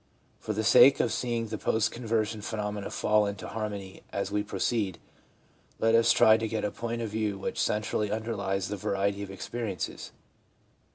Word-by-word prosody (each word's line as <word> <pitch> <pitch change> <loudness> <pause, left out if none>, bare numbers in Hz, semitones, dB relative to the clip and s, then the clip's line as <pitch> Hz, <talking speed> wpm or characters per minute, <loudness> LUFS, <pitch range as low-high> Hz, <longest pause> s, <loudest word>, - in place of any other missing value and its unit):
For 110 - -3
the 110 +1 -1
sake 130 +4 +7
of 115 - +1
seeing 120 -2 -1
the 110 -1 -5
post 110 0 +1
conversion 110 -2 -1
phenomena 105 -1 -4
fall 105 -1 +2
into 100 0 -5
har 110 -1 -3
mony 95 -2 -8
as 100 0 -2
we 105 0 +1
proceed, 100 -1 -1 0.8
let 115 0 +2
us 115 0 +5
try 110 0 +6
to 110 0 -2
get 110 -1 -2
a 105 - -1
point 115 0 -4
of 110 - -3
view 105 -1 -1
which 95 - -3
centrally 105 0 0
underlies 100 -3 -2
the 105 - -3
variety 100 +1 -1
of 100 - -6
experiences. 100 0 -5
105 Hz, 175 wpm, -28 LUFS, 100-115 Hz, 0.8 s, sake